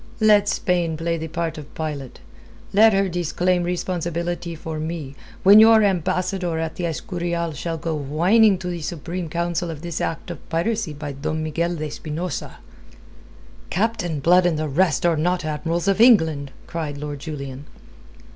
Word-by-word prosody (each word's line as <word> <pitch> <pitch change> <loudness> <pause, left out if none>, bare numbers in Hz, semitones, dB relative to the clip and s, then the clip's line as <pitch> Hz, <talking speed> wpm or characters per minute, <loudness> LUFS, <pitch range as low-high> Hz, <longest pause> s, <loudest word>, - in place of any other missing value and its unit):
"Let 210 -2 +5
Spain 170 -3 0
play 165 +1 -1
the 160 - -4
part 165 -1 -3
of 150 -1 -12
Pilate. 145 -5 -5 0.5
Let 220 +3 +7
her 195 -1 +2
disclaim 175 +1 0
responsibility 175 -1 -3
for 160 0 -6
me, 155 -3 -5 0.3
when 200 +3 +9
your 220 0 +7
ambassador 185 -2 0
at 160 0 -2
the 175 - -2
Escurial 170 0 -3
shall 165 +3 -4
go 160 +1 -3
whining 175 +9 +3
to 180 - -6
the 175 -2 -4
Supreme 170 +2 -5
Council 170 +1 -1
of 160 -1 -7
this 170 -2 -4
act 165 +2 -3
of 170 - -10
piracy 170 +1 -1
by 145 0 -6
Don 155 +3 -3
Miguel 170 +3 -1
de 155 -1 -4
Espinosa." 155 +1 -5 1.1
"Captain 190 -6 -1
Blood 180 +5 +4
and 165 -3 0
the 155 0 -1
rest 160 +3 +1
are 170 -1 +4
not 175 +2 0
admirals 165 +4 -2
of 195 +2 +3
England!" 160 - +5 0.2
cried 155 -4 -4
Lord 145 0 -5
Julian. 140 -2 -7
170 Hz, 160 wpm, -22 LUFS, 155-180 Hz, 1.1 s, when